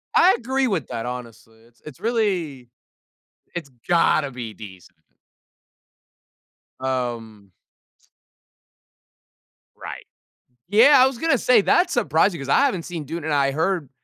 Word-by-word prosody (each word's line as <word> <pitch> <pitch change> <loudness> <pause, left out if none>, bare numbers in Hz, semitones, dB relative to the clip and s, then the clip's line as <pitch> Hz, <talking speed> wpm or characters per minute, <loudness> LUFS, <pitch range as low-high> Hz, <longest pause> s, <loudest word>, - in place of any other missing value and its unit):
I 370 +3 +6
agree 260 +2 -1
with 185 - -2
that, 115 - -5
honestly, 115 -2 -9
it's 115 +1 -26
it's 150 -4 -11
really 185 - -2 0.9
it's 165 -5 -6 0.2
gotta 165 -4 +2
be 120 -4 -8
decent. 95 -4 -13 1.8
Um 120 -6 -4 2.2
Right. - - -9 0.6
Yeah, 230 +9 +6
I - - +7
was 265 -2 -1
gonna 320 +1 +1
say 240 -2 +4
that's 350 - +2
surprising 165 +4 +1
'cause 135 - -7
I - - +4
haven't 235 -12 +1
seen 170 -3 -6
Dune, 165 +3 -6
and 155 -1 -2
I 140 -1 +2
heard 160 0 -1
155 Hz, 125 wpm, -22 LUFS, -, 2.2 s, I